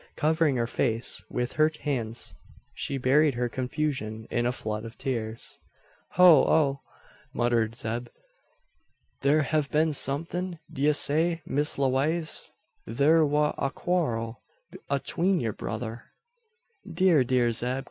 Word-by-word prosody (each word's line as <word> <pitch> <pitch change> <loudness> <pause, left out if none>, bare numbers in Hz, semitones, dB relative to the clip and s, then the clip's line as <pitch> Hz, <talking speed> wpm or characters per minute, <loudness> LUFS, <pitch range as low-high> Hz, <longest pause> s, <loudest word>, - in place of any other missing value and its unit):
Covering 160 -2 +2
her 120 -1 0
face 115 0 -2
with 125 0 -3
her 155 +2 +3
hands, 120 -6 -4 0.4
she 140 - -3
buried 135 +2 +3
her 120 0 0
confusion 125 -4 -3
in 120 0 0
a - - +1
flood 110 -3 -4
of 115 0 -10
tears. 115 -5 -5 0.5
"Hoh 175 -5 +7
oh!" 140 -3 +2 0.5
muttered 120 -2 +1
Zeb; 120 +1 -4 1.1
"thur 145 +3 +3
hev 150 +1 0
been 155 +1 +1
somethin'? 170 +6 0 0.2
D'ye 145 +3 +2
say, 165 +4 0
Miss 145 +2 -1
Lewaze, 140 +5 +1 0.4
thur 150 +7 +4
war 150 0 +1
a - - 0
a - - +1
quarrel 120 -10 -2 0.5
atween 170 +7 0
yur 115 -4 -2
brother 115 +2 -6 0.4
" 465 +1 -18
"Dear, 180 -8 +4
dear 125 -1 +2
Zeb!" 125 +3 +2
135 Hz, 130 wpm, -27 LUFS, 120-155 Hz, 1.1 s, Hoh